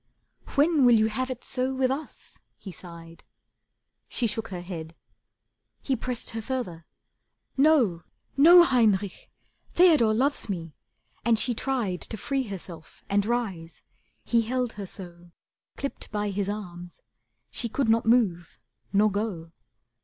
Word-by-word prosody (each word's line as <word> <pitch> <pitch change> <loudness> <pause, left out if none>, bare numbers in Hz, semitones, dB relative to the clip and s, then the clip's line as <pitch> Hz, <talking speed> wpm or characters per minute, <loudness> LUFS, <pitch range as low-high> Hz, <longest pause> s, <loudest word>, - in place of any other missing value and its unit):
"When 300 0 +4
will 245 -1 +7
you 220 0 +3
have 255 +4 -2
it 255 -2 -6
so 260 0 -1
with 260 -1 +1
us?" 290 +3 -7 0.2
He 195 - -9
sighed. 170 -1 -12 0.8
She 245 - -1
shook 225 0 -2
her 180 -2 -6
head. 165 -3 -7 0.9
He 270 - 0
pressed 245 0 -4
her 225 0 -4
further. 205 -10 -4 0.7
"No, 265 - +4 0.3
No, 340 +5 +9
Heinrich, 210 - +1 0.4
Theodore 305 -12 +5
loves 275 0 0
me," 165 -5 -4 0.5
and 235 -1 +3
she 245 +3 0
tried 230 -7 -2
To 220 - -5
free 270 +2 -2
herself 175 -4 -9
and 200 +1 +2
rise. 195 -9 -3 0.4
He 235 -1 +2
held 250 +1 -2
her 200 -2 -7
so, 175 -2 -9 0.5
Clipped 275 - -5
by 210 -1 -1
his 200 0 -2
arms, 180 -4 -7 0.5
she 235 - -3
could 265 +2 0
not 225 0 +2
move 200 -8 +2 0.3
nor 210 +1 +3
go. 195 -6 -3
220 Hz, 140 wpm, -26 LUFS, 180-255 Hz, 0.9 s, No